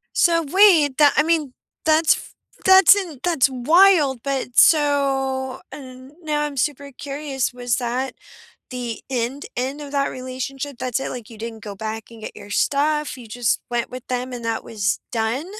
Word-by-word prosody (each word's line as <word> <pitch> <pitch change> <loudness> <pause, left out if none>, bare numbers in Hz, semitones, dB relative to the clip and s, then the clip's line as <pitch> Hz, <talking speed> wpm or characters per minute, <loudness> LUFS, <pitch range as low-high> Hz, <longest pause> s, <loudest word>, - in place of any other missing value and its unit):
So, 335 -1 +3
wait, 330 -6 +5
the 295 -2 +6
I 300 - +4
mean, 310 -5 0 0.3
that's 315 +1 +4
f - - -11 0.3
that's 380 +1 +8
in 350 -9 -5
that's 325 -7 +2
wild, 295 0 +4
but 270 -3 -3
so, 270 -3 +2
and 260 0 -11
now 300 -1 -1
I'm 295 -2 -5
super 280 +1 -2
curious, 275 -2 -3
was 245 -2 -1
that 250 +1 -3 0.5
the 245 -3 -5
end, 255 +2 -3
end 265 +4 -3
of 285 -1 -8
that 280 -1 +1
relationship? 260 +2 -6
That's 255 0 -2
it? 270 - -4
Like, 245 -2 -8
you 225 - -12
didn't 225 -1 -7
go 205 -2 -7
back 220 +2 -5
and 230 -1 -13
get - - -8
your 205 0 -12
stuff? 295 +7 0
You 240 -3 -11
just 225 0 -1
went 240 -1 -2
with 255 0 -9
them 250 0 -3
and 240 -1 -7
that 225 -1 -2
was 205 -2 -2
done? 230 +5 -1
265 Hz, 175 wpm, -21 LUFS, 245-295 Hz, 0.5 s, that's